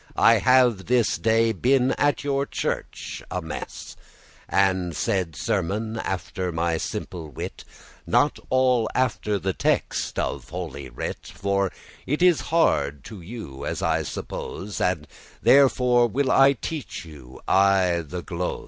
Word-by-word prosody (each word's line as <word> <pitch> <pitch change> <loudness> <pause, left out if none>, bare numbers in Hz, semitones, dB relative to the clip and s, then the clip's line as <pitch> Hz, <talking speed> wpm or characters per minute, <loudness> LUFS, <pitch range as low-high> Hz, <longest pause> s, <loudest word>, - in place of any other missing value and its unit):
I 115 -1 +6
have 125 -5 +4
this 125 -3 +2
day 115 0 +3
been 125 +5 +2
at 145 +1 +1
your 140 -1 0
church - - -4
at 90 -1 -3
mess,* 80 - -5
*mass - - -9 0.5
And 95 -3 +1
said 90 -5 -1
sermon 110 +11 -2
after 90 -1 -3
my 85 0 0
simple 85 -1 -5
wit, 70 - -7 0.4
Not - - +2
all 130 -3 +3
after 105 -4 0
the 95 -1 -2
text - - -1
of - - -3
Holy 75 -7 -6
Writ; - - -6
For 100 -1 0 0.4
it 150 +6 0
is 175 -8 +5
hard 75 - +2
to 105 -5 -10
you, 85 - -8
as - - -3
I - - +2
suppose, 100 +1 -6
And 85 -5 0 0.4
therefore 125 -3 +5
will 130 +3 0
I 135 +1 +6
teach 140 - -6
you 70 -5 -12
aye 95 -3 +3
the 85 +4 -6
glose. 90 0 -3
100 Hz, 140 wpm, -24 LUFS, 85-125 Hz, 0.5 s, I